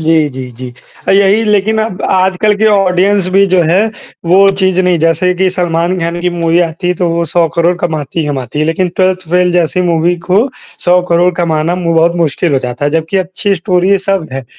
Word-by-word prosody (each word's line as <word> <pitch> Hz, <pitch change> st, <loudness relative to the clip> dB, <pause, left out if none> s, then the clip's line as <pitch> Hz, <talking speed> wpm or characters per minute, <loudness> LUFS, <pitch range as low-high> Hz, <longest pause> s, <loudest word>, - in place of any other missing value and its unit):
जी, 160 Hz, -1 st, +2 dB
जी, 130 Hz, -1 st, -7 dB
जी। 125 Hz, +1 st, -9 dB, 0.4 s
अ, -, -, +4 dB
यही 200 Hz, +3 st, +3 dB
लेक़िन 210 Hz, +1 st, +1 dB
अब 220 Hz, -4 st, -3 dB
आजकल 190 Hz, +3 st, +1 dB
की 220 Hz, +1 st, +1 dB
ऑडियंस 195 Hz, -1 st, +2 dB
भी 195 Hz, +1 st, +4 dB
जो 180 Hz, -2 st, +2 dB
है 195 Hz, +5 st, +3 dB, 0.4 s
वो 195 Hz, +3 st, +5 dB
चीज़ 190 Hz, -1 st, +1 dB
नहीं 180 Hz, -2 st, +1 dB
जैसे 165 Hz, +3 st, +1 dB
कि 190 Hz, +1 st, +1 dB
सलमान 175 Hz, 0 st, -1 dB
ख़ान 170 Hz, +1 st, -3 dB
की 180 Hz, 0 st, -1 dB
मूवी 170 Hz, 0 st, 0 dB
आती 170 Hz, +2 st, -2 dB
है 180 Hz, -, +1 dB
तो 175 Hz, -, +1 dB
वो 170 Hz, 0 st, -1 dB
100 170 Hz, -1 st, +3 dB
करोड़ 170 Hz, +1 st, +2 dB
कमाती 160 Hz, -1 st, -3 dB
ही 150 Hz, -, -2 dB
कमाती 140 Hz, 0 st, -4 dB
है। 155 Hz, -, +1 dB
लेक़िन 175 Hz, +3 st, 0 dB
12th 185 Hz, -2 st, 0 dB
फ़ेल 180 Hz, 0 st, +2 dB
जैसी 175 Hz, +1 st, 0 dB
मूवी 170 Hz, +2 st, +1 dB
को 210 Hz, +9 st, +2 dB, 0.4 s
100 180 Hz, +1 st, +4 dB
करोड़ 175 Hz, +1 st, +3 dB
कमाना 160 Hz, 0 st, 0 dB
वो 165 Hz, 0 st, 0 dB
बहुत 170 Hz, +1 st, +2 dB
मुश्किल 165 Hz, 0 st, 0 dB
हो 135 Hz, -, +2 dB
जाता 125 Hz, +2 st, -5 dB
है। 145 Hz, -, +1 dB
जबकि 165 Hz, +4 st, -2 dB
अच्छी 190 Hz, +2 st, -1 dB
स्टोरी 185 Hz, -1 st, 0 dB
ये 200 Hz, -, +3 dB
सब 190 Hz, -5 st, 0 dB
हैं, 135 Hz, -1 st, -5 dB
175 Hz, 220 wpm, -12 LUFS, 165-190 Hz, 0.4 s, वो